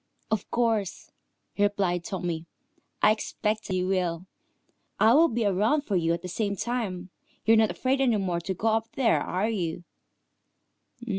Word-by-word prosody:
"Of 220 -3 -1
course," 225 -5 -1 0.5
replied 195 -4 +1
Tommy. 170 -3 -4 0.6
"I 210 - +7
expected 215 -2 -2
you 180 0 0
would. 180 -2 -1 0.7
I 225 - +6
will 325 +5 +6
be 235 -4 -1
around 210 +9 +2
for 210 -8 -3
you 165 -2 +2
at 170 +1 -2
the - - -4
same 200 +2 -2
time. 195 -6 -3 0.3
You're 225 +2 +6
not 220 -1 +4
afraid 265 +1 0
any 240 -5 +3
more 180 -4 -1
to 190 +2 -4
go 225 +5 0
up 225 0 +1
there, 255 -4 +3
are 185 +4 -1
you?" 175 -6 -2
200 Hz, 155 wpm, -27 LUFS, 180-225 Hz, 0.7 s, I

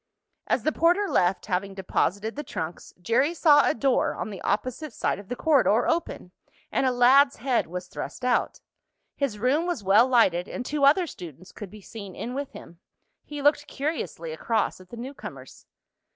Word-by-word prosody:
As - - 0
the 310 - +2
porter 350 +6 +2
left, 180 - +1
having 195 0 -2
deposited 200 +3 -1
the 295 - -4
trunks, 165 - -6
Jerry 255 - +1
saw 295 -3 +5
a - - 0
door 265 +2 +1
on 180 +5 -5
the 195 - -8
opposite 255 +7 -2
side - - -1
of 200 - -12
the 245 - -3
corridor 250 -7 +3
open, 330 - -2 0.4
and 265 - +1
a - - +3
lad's 265 +3 +5
head 255 -1 0
was 180 +2 -6
thrust 250 - -7
out. 250 -1 0 0.5
His 275 -7 -2
room 275 - +1
was 345 - -3
well 205 +6 +5
lighted, 195 -9 +3
and 250 - -6
two 290 0 +1
other 315 +6 +5
students 180 - -11
could 205 - -9
be 210 +2 -13
seen 200 -2 -10
in 245 - -5
with 280 +1 -4
him. 170 - -12 0.5
He 295 -1 -7
looked 290 0 +3
curiously 270 - -4
across 185 +5 -1
at 185 - -17
the 235 - -10
newcomers. 265 +4 -9
245 Hz, 180 wpm, -26 LUFS, 195-285 Hz, 0.5 s, saw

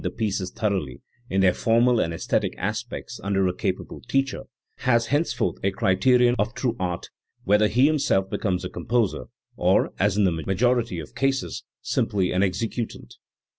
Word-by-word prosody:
331 - - -4
the - - -22
pieces 95 -2 -2
thoroughly, 100 - -2 0.3
in 95 +1 +1
their 90 -2 +5
formal 115 +3 +3
and 85 - 0
aesthetic 80 - -1
aspects, - - -4
under 95 -1 +1
a 90 - +1
capable 95 0 -4
teacher, 135 0 0 0.3
has 120 -2 +2
henceforth 155 +3 0
a 100 - +3
criterion 120 +5 +3
of 105 +3 0
true 120 -3 -1
art, 90 -1 -3 0.3
whether 105 +2 +4
he 125 +5 +3
himself 140 -11 +2
becomes 95 -2 -2
a - - -4
composer 115 -3 -1 0.3
or, - - +2
as 100 0 +2
in 105 - +4
the 95 - +3
majority 105 +6 0
of 80 -3 -8
cases, 135 0 -1 0.2
simply 95 -3 0
an 90 - +1
executant. 100 - -3
100 Hz, 165 wpm, -24 LUFS, 95-120 Hz, 0.3 s, their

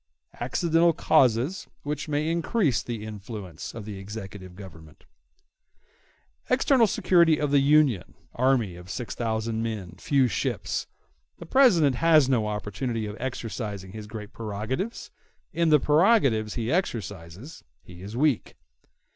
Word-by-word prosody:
]] - - -24
Accidental 165 +6 +2
Causes 135 - +2 0.2
Which 150 +1 -4
May 150 +1 -1
Increase 170 - +1
The 115 -3 -6
Influence 105 -5 -8
Of 110 -3 -7
The 105 -2 -7
Executive 95 -2 -8
Government 80 -6 -13 1.4
External 255 -2 +4
security 170 -5 +3
of 150 -1 -1
the 145 - +5
Union—Army 130 - +1
of 90 +1 -12
six 110 -1 -5
thousand 110 -1 -2
men—Few 115 - 0
ships—The 145 - -5
President 165 - +4
has 155 -3 +5
no 120 -5 +1
opportunity 105 +2 -3
of 105 0 -6
exercising 105 -6 -5
his 105 0 -8
great 105 -1 -8
prerogatives—In 130 - -4
the 150 -1 +6
prerogatives 145 - +3
he 115 0 -2
exercises 110 - -4 0.2
he 90 0 -13
is 105 +5 -7
weak. 145 -4 +1
120 Hz, 120 wpm, -26 LUFS, 105-150 Hz, 1.4 s, the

